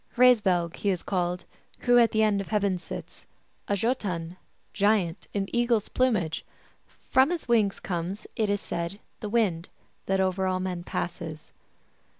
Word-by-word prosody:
" - - -28
Hraesvelg 195 -9 +4
he 205 - 0
is 180 -3 -1
called 180 -2 -1 0.4
Who 245 0 +5
at 230 -1 +6
the 220 0 +3
end 205 -2 +2
of 195 - -7
heaven 200 -4 +1
sits, - - -9 0.4
A - - +1
Jbtun 190 -6 -1 0.4
(giant) 200 -4 +1
in 195 -1 -1
eagle 240 -1 +3
s 210 - -6
plumage: 210 -11 +1 0.7
From 260 +2 +5
his 345 -5 -3
wings 220 -5 +2
comes, 180 +3 -4
It 215 -2 +1
is 205 0 0
said, 170 +4 -4 0.2
the 210 - -4
wind 200 -7 +1 0.4
That 195 0 +2
over 190 0 +1
all 185 0 0
men 185 -2 -3
passes." 170 -3 -5
195 Hz, 160 wpm, -27 LUFS, 175-220 Hz, 0.7 s, at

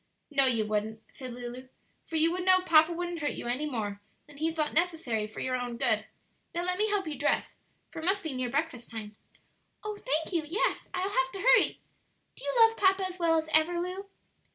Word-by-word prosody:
"No, 275 -2 +4
you 230 -4 +2
wouldn't," 215 +1 -2
said 255 -2 -8
Lulu, 245 +1 -7 0.4
"for 325 - -6
you 320 +1 +4
would 360 +1 -2
know 370 0 +6
papa 330 -2 +5
wouldn't 345 0 -3
hurt 295 -2 -1
you - - -6
any 255 +5 -1
more 205 -6 -3 0.2
than 290 -1 -16
he 320 +2 0
thought 310 -2 -1
necessary 310 -11 0
for 215 - -8
your 255 0 -1
own 245 -1 -3
good. 220 -4 +1 0.5
Now 345 - -1
let 360 +1 -1
me 430 +1 +2
help 410 -2 0
you 310 -2 -4
dress, 285 +2 0 0.3
for 330 - -7
it 320 - -4
must 390 +2 +1
be 315 -4 -3
near 255 -1 -2
breakfast 280 -2 -2
time." 215 -2 -7 0.7
"Oh, 425 -1 -5
thank 315 +4 -1
you; 335 - +2
yes, 335 +9 -1
I'll 365 - -2
have 350 -2 +1
to 390 - -5
hurry. - - +4 0.5
Do - - -11
you - - -1
love 455 0 +6
papa 385 -1 +3
as 370 0 -9
well 330 -1 +3
as 315 0 -1
ever, 320 +3 +3
Lu?" 365 +3 -4
315 Hz, 220 wpm, -29 LUFS, 250-360 Hz, 0.7 s, know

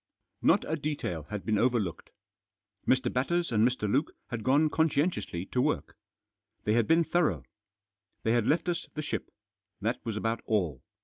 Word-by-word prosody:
Not - - +4
a 160 - 0
detail 140 - -3
had 105 -2 -5
been 110 -2 +2
overlooked. 115 -9 0 0.8
Mr. 130 -1 +2
Batters 170 +6 +1
and 110 -1 +3
Mr. 120 -3 +1
Luke 135 +9 +1 0.2
had 115 -3 -3
gone 145 +4 +4
conscientiously 155 - 0
to 125 - +2
work. - - -1 0.7
They 105 - +2
had 115 -1 +3
been 165 +1 +5
thorough. 170 0 +1 0.8
They 110 - +2
had 120 -2 +2
left 165 +3 +2
us 175 -1 -1
the 155 - -3
ship. 150 - -3 0.5
That 115 +4 -2
was 110 -2 -3
about 115 +1 -1
all. 85 - 0
125 Hz, 165 wpm, -29 LUFS, 105-155 Hz, 0.8 s, been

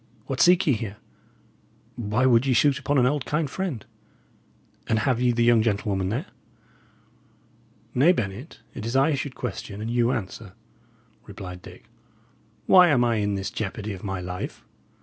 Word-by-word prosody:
what 135 -1 -2
seek 180 +2 +5
ye 145 - +3
here? 110 -3 -5 1.0
Why 120 +2 0
would 125 +1 +4
ye 130 - +3
shoot 140 +2 +3
upon 140 +1 0
an 125 - +4
old, 140 +1 +1
kind 150 +2 -1
friend? 150 - -4 1.0
And 110 - +1
have 120 +2 0
ye 125 -1 +3
the 120 0 +1
young 120 -1 +5
gentlewoman 100 -3 -1
there?" 125 - -2 1.7
"Nay, 140 +8 +5
Bennet, 120 - -4
it - - -7
is 115 +3 -3
I 140 +4 +3
should 140 -1 -4
question 105 -3 -6
and 110 +2 -4
you 120 0 +2
answer," 100 -2 -5 0.7
replied 95 -3 -9
Dick. - - -14 0.8
"Why 180 -1 +7
am 135 -7 +3
I 120 -2 +1
in 100 -1 0
this 95 0 -4
jeopardy 105 0 -4
of 95 - -10
my 95 -2 -3
life? 90 0 -6
120 Hz, 165 wpm, -25 LUFS, 100-135 Hz, 1.7 s, Why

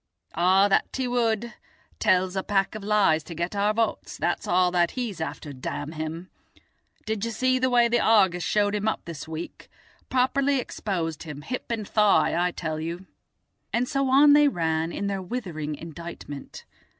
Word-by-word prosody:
"Ah, 185 +4 +4
that 195 - +2
he 260 -1 -1
would. 235 -1 0 0.5
Tells 185 0 +2
a 190 - 0
pack 195 0 0
of 215 -2 -7
lies 200 -7 +3
to 170 - -8
get 170 +4 -3
our 205 +1 +2
votes, 225 +1 -2
that's - - -1
all 180 0 +3
that 175 -1 +2
he's 220 -9 -3
after, 150 -2 -5
damn 145 +3 -5
him. 160 +3 -6 0.7
Did 220 -1 -2
you 230 - -1
see 255 +3 +1
the 260 0 +2
way 240 -1 +4
the 240 +1 +2
Argus 190 -6 +4
showed 205 +3 +1
him 210 +1 -1
up 220 - -1
this 165 -2 -7
week? 160 +1 -7 0.4
Properly 270 +2 +2
exposed 175 - -3
him, 150 -2 -8
hip 250 +8 -5
and 220 -3 -3
thigh, 210 -2 +3
I 175 +1 +2
tell 160 -3 -4
you." 170 +4 -5 0.7
And 245 +2 0
so 275 0 0
on 285 +2 +7
they 295 0 +6
ran, 165 - 0
in 200 - -4
their 195 -1 -2
withering 175 -8 -4
indictment. 165 -3 -9
195 Hz, 175 wpm, -25 LUFS, 165-230 Hz, 0.7 s, on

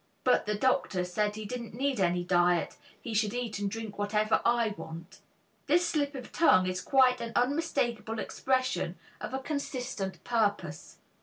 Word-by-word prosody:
But 250 -4 +3
the 210 - +1
doctor 205 -6 +1
said 210 +3 -1
he 215 0 -6
didn't 235 0 -6
need 270 0 0
any 175 -1 +2
diet, 175 -1 +2 0.2
he 230 - -6
should 215 +1 +1
eat 235 -4 -3
and 200 -1 -1
drink 220 -1 -6
whatever 210 +1 +2
I 235 -1 +3
want." 175 -1 -9 0.5
This 340 +4 +4
slip 290 -3 0
of 255 -2 -8
tongue 185 - +5
is 185 0 -2
quite 255 -2 +4
an 230 -1 -5
unmistakable 245 -4 0
expression 255 -8 -1 0.2
of 260 - -4
a - - 0
consistent 260 -8 -4
purpose. 205 -10 -1
225 Hz, 160 wpm, -30 LUFS, 195-255 Hz, 0.5 s, tongue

